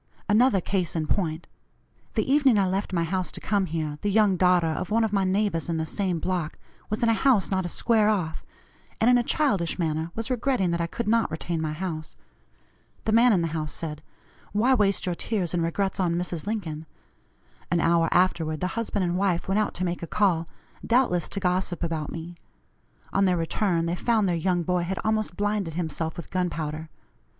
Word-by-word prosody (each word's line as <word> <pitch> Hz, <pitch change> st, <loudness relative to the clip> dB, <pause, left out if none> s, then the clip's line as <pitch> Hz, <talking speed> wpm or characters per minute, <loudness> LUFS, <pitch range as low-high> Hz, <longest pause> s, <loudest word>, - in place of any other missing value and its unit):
Another 220 Hz, -1 st, +4 dB
case 180 Hz, -2 st, -1 dB
in 160 Hz, -2 st, 0 dB
point: 160 Hz, -1 st, -1 dB, 0.7 s
The -, -, +1 dB
evening 270 Hz, -4 st, +4 dB
I 195 Hz, -2 st, +3 dB
left 195 Hz, +2 st, -2 dB
my 170 Hz, -2 st, +1 dB
house 185 Hz, +2 st, -1 dB
to -, -, -5 dB
come 200 Hz, -3 st, 0 dB
here, 155 Hz, -2 st, -3 dB
the 205 Hz, -, 0 dB
young 205 Hz, -1 st, +4 dB
daughter 180 Hz, -1 st, +4 dB
of 160 Hz, +2 st, -2 dB
one 225 Hz, +2 st, +2 dB
of 220 Hz, -2 st, -1 dB
my 195 Hz, -1 st, +2 dB
neighbors 190 Hz, -3 st, 0 dB
in 165 Hz, -, 0 dB
the 160 Hz, -, -1 dB
same 185 Hz, +1 st, -1 dB
block, 170 Hz, -2 st, -2 dB, 0.3 s
was 215 Hz, +2 st, -2 dB
in 230 Hz, -, +4 dB
a -, -, +5 dB
house 225 Hz, -4 st, +2 dB
not 190 Hz, -2 st, 0 dB
a -, -, -6 dB
square 215 Hz, +2 st, +2 dB
off, 180 Hz, -7 st, -1 dB, 0.6 s
and 230 Hz, +3 st, +5 dB
in 245 Hz, -, +5 dB
a -, -, +1 dB
childish 230 Hz, -, +1 dB
manner 160 Hz, -1 st, -1 dB
was 225 Hz, +3 st, -3 dB
regretting 245 Hz, -7 st, +1 dB
that 170 Hz, 0 st, 0 dB
I 170 Hz, -, 0 dB
could 235 Hz, +7 st, -4 dB
not 230 Hz, +1 st, +2 dB
retain 160 Hz, +1 st, -3 dB
my 155 Hz, -1 st, -2 dB
house. 155 Hz, -2 st, -5 dB, 0.9 s
The 220 Hz, -, +1 dB
man 235 Hz, +2 st, +6 dB
in 180 Hz, -5 st, +3 dB
the 165 Hz, -, -1 dB
house 155 Hz, -1 st, -3 dB
said: 150 Hz, -2 st, -5 dB, 0.5 s
'Why 235 Hz, +6 st, +3 dB
waste 200 Hz, -6 st, +2 dB
your 180 Hz, -, 0 dB
tears 185 Hz, -2 st, -2 dB
and 175 Hz, -, +1 dB
regrets 190 Hz, +4 st, -1 dB
on 175 Hz, -3 st, +1 dB
Mrs. 175 Hz, 0 st, -3 dB
Lincoln?' 165 Hz, -8 st, -4 dB, 0.8 s
An 175 Hz, -, +2 dB
hour 165 Hz, 0 st, +3 dB
afterward 165 Hz, -4 st, +2 dB
the 180 Hz, -, -1 dB
husband 215 Hz, -4 st, -1 dB
and 175 Hz, 0 st, -1 dB
wife 185 Hz, -4 st, 0 dB
went 195 Hz, +2 st, +2 dB
out 215 Hz, -, -1 dB
to 185 Hz, -, -1 dB
make 175 Hz, 0 st, -3 dB
a 170 Hz, -, -5 dB
call, 175 Hz, -5 st, +1 dB, 0.4 s
doubtless 230 Hz, -9 st, +2 dB
to 200 Hz, -, -3 dB
gossip 180 Hz, -1 st, -1 dB
about 160 Hz, -3 st, -2 dB
me; 170 Hz, +1 st, -7 dB, 0.8 s
on 195 Hz, -, +3 dB
their 180 Hz, -2 st, +2 dB
return 165 Hz, +1 st, 0 dB
they 170 Hz, -, -1 dB
found 215 Hz, +2 st, +1 dB
their 175 Hz, -, +1 dB
young 175 Hz, +1 st, 0 dB
boy 180 Hz, +1 st, 0 dB
had 180 Hz, +2 st, -3 dB
almost 215 Hz, -4 st, 0 dB
blinded 205 Hz, -5 st, -1 dB
himself 160 Hz, 0 st, -3 dB
with 170 Hz, -, -8 dB
gunpowder. 160 Hz, -3 st, -2 dB
180 Hz, 205 wpm, -26 LUFS, 165-210 Hz, 0.9 s, man